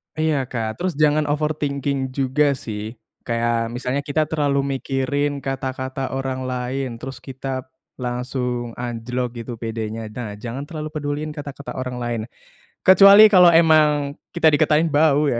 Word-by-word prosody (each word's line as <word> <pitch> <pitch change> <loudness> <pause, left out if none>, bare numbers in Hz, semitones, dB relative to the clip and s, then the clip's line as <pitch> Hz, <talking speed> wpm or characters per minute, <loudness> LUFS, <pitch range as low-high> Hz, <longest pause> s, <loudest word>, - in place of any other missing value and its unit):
Iya, 155 -4 0
Kak. 110 -3 -4
Terus 180 0 -1
jangan 150 0 +3
overthinking 140 -3 -1
juga, 140 +1 +2
sih. 110 -2 -6 0.3
Kayak 115 0 0
misalnya 125 +2 -2
kita 145 +2 0
terlalu 140 -3 0
mikirin 140 +2 -1
kata-kata 130 0 -4
orang 130 -1 -3
lain, 125 0 -3
terus 130 +1 -8
kita, 130 0 -5 0.3
langsung 125 -1 -3
anjlok 125 0 -3
gitu 115 0 -7
pedenya. 110 -1 -4
Nah, 110 -4 -6
jangan 120 +5 -6
terlalu 155 -2 -6
peduliin 150 0 -3
kata-kata 145 -2 -7
orang 125 -1 -4
lain. 120 -2 -2 0.6
Kecuali 200 +3 +8
kalo 180 -3 +8
emang 150 -3 +4 0.2
kita 160 -2 +5
dikatain 150 +2 +3
bau, 145 -1 +3
ya, 120 - 0
135 Hz, 135 wpm, -21 LUFS, 125-150 Hz, 0.6 s, Kecuali